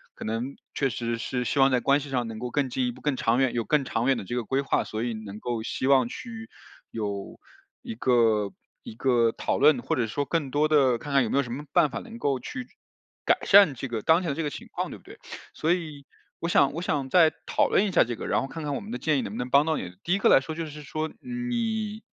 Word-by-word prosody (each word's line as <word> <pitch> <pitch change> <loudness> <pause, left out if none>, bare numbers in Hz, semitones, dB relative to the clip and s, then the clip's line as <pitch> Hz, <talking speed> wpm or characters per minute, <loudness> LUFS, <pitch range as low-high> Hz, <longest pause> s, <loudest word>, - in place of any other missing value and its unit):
可 - - -9
能 115 +5 -3 0.2
确 135 - 0
实 115 0 -3
是 125 +2 -3
希 130 +5 -1
望 135 0 +5
在 125 - +2
关 140 +1 +3
系 145 0 -8
上 125 -2 -1
能 110 -1 -7
够 125 +1 -5
更 140 -1 0
进 125 0 -1
一 - - -1
步 - - -15
更 145 -3 -1
长 115 +1 +2
远 130 -2 +2
有 115 -2 -1
更 150 -2 +2
长 120 -2 -1
远 135 -2 +3
的 110 - -5
这 95 - -6
个 120 - -2
规 135 +4 0
划， 140 - 0
所 110 +2 -4
以 120 - -2
能 105 -1 -8
够 120 -2 -2
希 125 +3 -3
望 130 -3 +5
去 225 - -8 0.4
有 100 -3 -5 0.4
一 - - -6
个 115 -5 +2 0.3
一 110 - -9
个 120 -2 +2
讨 - - -1
论， 150 +2 +5
或 - - 0
者 115 -3 0
说 145 +6 -2
更 150 -2 -1
多 145 +3 +2
的 135 -5 +4
看 140 +4 -7
看 135 - +5
有 115 - -2
没 - - 0
有 140 - +3
什 120 - -8
么 145 +3 -5
办 150 - +4
法 - - -4
能 230 -1 -10
够 140 - 0
去 250 - -6 0.6
改 - - +4
善 195 -8 +7
这 135 - -5
个 115 -3 -3
当 160 - +4
前 175 - -3
的 140 - -1
这 165 - -2
个 150 - -1
情 - - -9
况， - - -3
对 - - -8
不 - - -23
对？ - - -14 0.3
所 160 +2 0
以 155 -5 -5 0.3
我 170 - -2
想 140 -5 +4
我 165 - -4
想 145 -6 -1
再 165 -1 +5
讨 - - +1
论 200 - +3
一 - - -2
下 175 - +5
这 120 -1 -4
个， - - -7
然 - - +1
后 - - -4
看 160 +3 -7
看 145 - -2
我 - - -2
们 205 - -10
的 245 - -3
建 155 -2 +1
议 - - 0
能 100 - -5
不 110 - -6
能 125 +1 -3
帮 140 +2 +5
到 160 - +1
你。 90 -1 -6
第 175 - 0
1 - - +3
个 200 - +3
来 - - +7
说 145 +4 -6
就 165 0 -3
是 150 0 -9
说 155 +2 -4
你 230 -4 -3
135 Hz, 300 characters per minute, -26 LUFS, 120-155 Hz, 0.6 s, 善